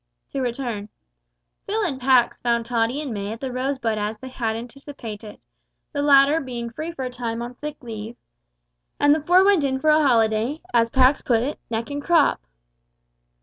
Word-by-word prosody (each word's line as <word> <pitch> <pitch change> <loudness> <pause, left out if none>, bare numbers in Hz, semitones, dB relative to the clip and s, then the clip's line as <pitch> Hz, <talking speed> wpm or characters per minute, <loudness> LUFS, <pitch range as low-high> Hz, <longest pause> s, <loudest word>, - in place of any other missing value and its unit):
To 275 - -2
return: 235 -4 -3 0.8
Phil 435 +2 0
and 270 -9 -2
Pax 250 -2 +3
found 235 -1 +1
Tottie 235 +4 0
and 280 -6 -4
May 205 0 -4
at 225 - -9
The 265 0 -4
Rosebud 255 -4 -1
as 210 +1 -3
they 260 - -9
had 230 -3 -2
anticipated 230 -3 -9 0.5
the 285 - -1
latter 285 +2 +5
being 240 -3 -5
free 315 +8 -5
for 270 -6 -5
a 250 - -4
time 235 -2 -4
on 240 +1 -7
sick 300 +2 -6
leave 225 0 -7 0.8
and 290 0 +5
the 310 - 0
four 360 +5 +5
went 395 -6 +4
in 265 -1 0
for 310 +2 +3
a 305 +1 +5
holiday, 230 +1 +2
as 230 -1 +3
Pax 260 +3 +4
put 230 -2 +1
it, 285 +4 -4
neck 230 +4 -3
and 285 0 -3
crop. 330 - +3
255 Hz, 185 wpm, -23 LUFS, 230-285 Hz, 0.8 s, latter